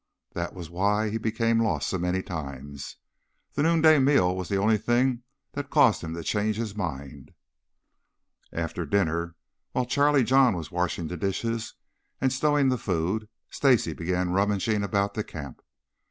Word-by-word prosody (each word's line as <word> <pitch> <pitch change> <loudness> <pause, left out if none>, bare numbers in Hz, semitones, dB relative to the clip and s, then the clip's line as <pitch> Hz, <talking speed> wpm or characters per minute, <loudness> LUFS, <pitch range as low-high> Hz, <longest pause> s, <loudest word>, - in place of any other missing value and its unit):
That - - -4
was 85 -3 -7
why 105 +4 +1
he 115 - -2
became 115 +1 +1
lost 80 -11 0
so 95 - -2
many 90 +2 -1
times. 70 -4 -7 0.6
The 145 - -1
noonday 160 -1 +5
meal 130 -10 +3
was 95 -1 -5
the 100 - +1
only 105 +2 +3
thing 120 +3 +1 0.3
that 145 0 -5
caused 110 -7 +4
him 80 0 -5
to 85 - -6
change 105 +4 0
his 110 -2 -3
mind. 70 - -6 1.2
After 85 +1 -3
dinner, 85 0 0 0.4
while 125 - 0
Charlie 140 +1 +3
John 130 -2 +4
was 85 0 -6
washing 90 -1 -1
the 90 - -5
dishes 110 +5 -2 0.4
and 130 0 +1
stowing 145 0 +2
the 125 -2 0
food, 95 +4 -1 0.2
Stacy 125 - +2
began 90 +2 -1
rummaging 100 +2 +1
about 100 0 0
the 110 - -2
camp. 70 -8 -9
100 Hz, 155 wpm, -26 LUFS, 85-120 Hz, 1.2 s, noonday